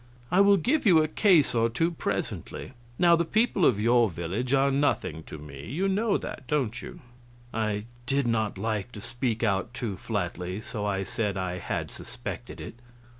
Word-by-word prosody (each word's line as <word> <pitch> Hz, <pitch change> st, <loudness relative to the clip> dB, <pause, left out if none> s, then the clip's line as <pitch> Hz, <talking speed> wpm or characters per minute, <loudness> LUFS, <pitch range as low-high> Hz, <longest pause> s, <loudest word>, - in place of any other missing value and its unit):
I 185 Hz, -, +5 dB
will 200 Hz, 0 st, +6 dB
give 265 Hz, -, +1 dB
you 175 Hz, -4 st, +7 dB
a -, -, 0 dB
case 170 Hz, -2 st, +4 dB
or 115 Hz, -1 st, +3 dB
two 165 Hz, +9 st, +1 dB
presently. 160 Hz, -, -4 dB, 0.3 s
Now 170 Hz, -1 st, +6 dB
the 170 Hz, -, +2 dB
people 210 Hz, 0 st, +2 dB
of 105 Hz, -, +2 dB
your 115 Hz, +1 st, +4 dB
village 90 Hz, +9 st, -3 dB
are 135 Hz, 0 st, +4 dB
nothing 115 Hz, -, 0 dB
to -, -, -8 dB
me 70 Hz, -2 st, -9 dB
you 175 Hz, +10 st, 0 dB
know 205 Hz, +2 st, +2 dB
that, 130 Hz, -, -7 dB
don't 130 Hz, -4 st, 0 dB
you?" 180 Hz, -2 st, -9 dB, 0.5 s
I 105 Hz, -2 st, -1 dB, 0.2 s
did 140 Hz, 0 st, +1 dB
not 110 Hz, -4 st, 0 dB
like 110 Hz, +2 st, -2 dB
to 105 Hz, -, -7 dB
speak 120 Hz, 0 st, -2 dB
out 100 Hz, +2 st, 0 dB
too 105 Hz, -7 st, -3 dB
flatly, 90 Hz, -3 st, -3 dB
so 105 Hz, -1 st, -4 dB
I 95 Hz, -1 st, 0 dB
said 100 Hz, 0 st, -2 dB
I 90 Hz, -1 st, -2 dB
had -, -, -3 dB
suspected -, -, -7 dB
it. 115 Hz, -, -8 dB
115 Hz, 180 wpm, -27 LUFS, 100-155 Hz, 0.5 s, you